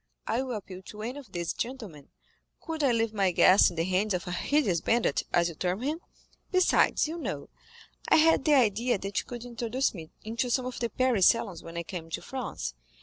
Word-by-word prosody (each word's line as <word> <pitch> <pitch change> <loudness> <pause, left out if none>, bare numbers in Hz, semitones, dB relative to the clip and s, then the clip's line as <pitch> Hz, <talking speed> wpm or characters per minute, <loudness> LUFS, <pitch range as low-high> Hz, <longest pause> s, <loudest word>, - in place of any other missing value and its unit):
I 240 - 0
will 255 -3 -3
appeal 190 -3 -8
to 210 0 -9
any 250 +5 -4
of 250 -9 -14
these 170 -2 -3
gentlemen, 220 - -6 0.5
could 320 -2 -4
I 270 - +4
leave 225 -1 0
my 195 -3 +2
guest 185 +2 +6
in 175 - -10
the 165 - 0
hands 190 +3 +1
of 175 - -4
a 180 - -5
hideous 195 - +1
bandit, 230 -9 +1
as 170 0 +3
you 170 - -5
term 180 +7 -2
him? 305 +4 -1 0.5
Besides, 370 -4 +3
you 330 +2 -5
know, - - -5 0.6
I - - +6
had 325 +1 +5
the 300 -2 +4
idea 235 -1 +2
that 195 0 -2
you - - -6
could 240 -1 -7
introduce 240 +2 -1
me 160 -5 -9
into 230 +3 -2
some 250 +1 +1
of 255 -1 -5
the 235 - -1
Paris 250 -8 +3
salons 230 -6 +1
when 165 0 -9
I 170 - -2
came 165 -1 -7
to - - -4
France. 255 - -5
225 Hz, 215 wpm, -28 LUFS, 185-255 Hz, 0.6 s, guest